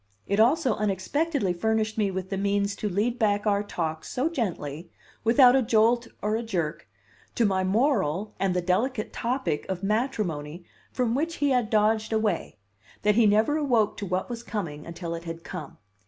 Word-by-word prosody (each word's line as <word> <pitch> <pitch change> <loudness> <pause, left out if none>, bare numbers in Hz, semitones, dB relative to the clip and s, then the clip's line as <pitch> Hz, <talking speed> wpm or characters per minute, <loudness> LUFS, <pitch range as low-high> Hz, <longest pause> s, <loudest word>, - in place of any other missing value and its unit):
It 200 +1 0
also 260 +2 +4
unexpectedly 210 - 0
furnished 220 +3 0
me 210 -3 +1
with 190 0 -5
the - - 0
means 200 0 0
to 210 - -2
lead 220 +6 0
back 205 -1 +1
our 200 -1 +2
talk 160 -6 -3
so 265 +6 -1
gently, 170 - -4 0.3
without 245 +2 +6
a 270 - +4
jolt 235 +1 +3 0.2
or 210 +1 +1
a 225 - -1
jerk, 175 - -3 0.5
to 235 - +3
my 190 -2 +1
moral 205 - +1
and 190 -2 +1
the 180 - 0
delicate 215 +6 0
topic 245 - -1
of 190 0 -3
matrimony 185 - -2 0.3
from 245 -3 0
which 325 +6 -1
he 290 -3 +1
had 245 -4 +1
dodged 220 0 +2
away, 215 - -1 0.5
that 210 - +4
he 225 0 +5
never 215 +8 +3
awoke 240 -8 +2
to 200 - -4
what 185 +1 -1
was 235 -1 -5
coming 170 -11 -5
until 170 0 -5
it 170 0 -6
had 165 0 -6
come. 180 -5 -8
210 Hz, 180 wpm, -26 LUFS, 185-235 Hz, 0.5 s, without